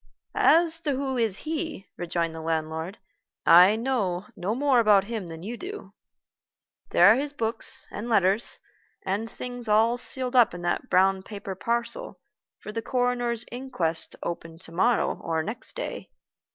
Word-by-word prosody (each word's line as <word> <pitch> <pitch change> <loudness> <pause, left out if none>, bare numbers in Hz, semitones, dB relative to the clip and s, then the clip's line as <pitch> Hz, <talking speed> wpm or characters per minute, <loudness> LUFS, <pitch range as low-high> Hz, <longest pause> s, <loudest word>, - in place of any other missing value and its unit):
"As 330 0 +4
to 300 -4 -1
who 265 0 -2
is 225 -5 +1
he," 315 - -3
rejoined 170 -1 -2
the 160 - -7
landlord, 160 +4 -3 0.5
"I 180 +5 +8
know 215 -7 -1
no 200 +5 -2
more 270 -1 +3
about 210 -4 +5
him 215 -3 -5
than 165 0 -9
you 235 +5 -5
do. 405 - -8 1.0
There 175 - +5
are 225 - +4
his 285 +1 -2
books, 225 -4 -4
and 225 +4 -5
letters, 200 0 +2 0.5
and 200 +4 -2
things 245 -1 -6
all 220 +3 +4
sealed 255 0 -1
up 235 -7 +5
in 175 - -8
that 175 - -1
brown 190 +1 +3
paper 200 -1 -7
parcel 235 - -3 0.4
for 210 - -8
the 230 +1 -3
coroner's 245 -1 0
inquest 185 -11 -2
to - - -16
open 165 -1 -5
to 165 -1 -12
morrow 225 +7 +1
or 160 -1 -1
next 225 +7 -5
day. - - -5
220 Hz, 160 wpm, -26 LUFS, 180-245 Hz, 1.0 s, I